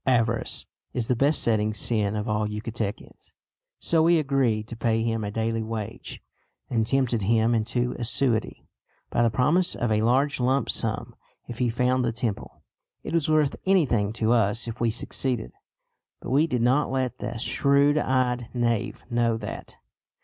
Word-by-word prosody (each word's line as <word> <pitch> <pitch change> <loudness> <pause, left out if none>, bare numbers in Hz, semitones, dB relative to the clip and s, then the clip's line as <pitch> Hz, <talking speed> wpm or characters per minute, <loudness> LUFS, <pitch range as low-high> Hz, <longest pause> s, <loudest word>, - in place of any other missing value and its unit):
Avarice 115 -3 0 0.3
is 120 -3 -2
the 125 - +3
besetting 115 -6 +2
sin 105 -2 0
of 105 0 -3
all 105 0 0
Yucatecans, 105 0 -6 0.4
so 165 -1 +2
we 170 +1 +4
agreed 135 -8 0
to 115 - -6
pay 115 0 0
him 115 -1 -1
a 105 - -3
daily 115 +1 -1
wage, 110 -2 -6 0.5
and 115 -2 +1
tempted 125 -4 +1
him 110 +3 +2
into 120 +2 -1
assiduity 120 -1 0 0.5
by - - +1
the 120 - +4
promise 150 +11 +2
of 120 -2 -1
a 105 0 +2
large 130 +6 +2
lump 130 +1 +1
sum - - -2 0.3
if 120 - -8
he 125 -2 +2
found 125 +2 +1
the 120 - 0
temple. 115 -3 -4 0.4
It - - -6
was 165 -3 +1
worth 155 -3 +2
anything 130 - +2
to 115 0 0
us 115 0 +2
if 115 +1 -6
we 120 - +2
succeeded; 120 +1 -1 0.7
but - - -7
we 145 +5 +3
did 125 -6 -1
not 130 +5 +2
let 130 -1 -2
the - - -4
shrewd 140 +4 +2
eyed 125 -3 0
knave 120 -3 -1
know 120 -1 +1
that. 105 -2 -8
120 Hz, 165 wpm, -25 LUFS, 110-130 Hz, 0.7 s, we